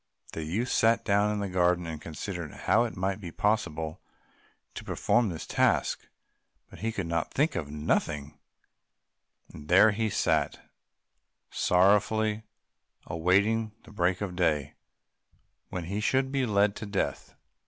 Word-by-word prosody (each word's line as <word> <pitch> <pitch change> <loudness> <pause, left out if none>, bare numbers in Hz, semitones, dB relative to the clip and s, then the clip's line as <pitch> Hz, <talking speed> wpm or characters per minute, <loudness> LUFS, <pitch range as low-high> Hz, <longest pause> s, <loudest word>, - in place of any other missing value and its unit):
The 80 - -5
youth 105 +11 -2
sat 115 +1 +3
down 100 0 +3
in 105 -1 -2
the 100 - -2
garden 90 -1 +1
and 80 -2 -6
considered 85 0 -6
how 115 +2 +4
it 115 - -6
might 95 +2 -2
be 90 - -6
possible 80 -8 -1 0.7
to - - -7
perform 120 -3 +1
this 80 -3 -6
task, - - +1 0.6
but - - -12
he 115 +2 -1
could 90 -6 -4 0.2
think 150 +4 0
of 75 -4 -3
nothing, 75 -1 -2 1.1
and 75 - -11
there 95 +6 +6
he 110 +1 -1
sat 105 - 0 0.9
sorrowfully 105 +4 +2 0.6
awaiting 100 +6 +1
the 115 - -15
break 90 -1 0
of 95 -3 -3
day, 75 -5 0 1.0
when 90 - -4
he 100 +5 -3
should 130 +4 +1
be 135 -2 0
led 100 -1 +2
to 105 - -6
death. 100 -1 -3
100 Hz, 140 wpm, -28 LUFS, 85-110 Hz, 1.1 s, there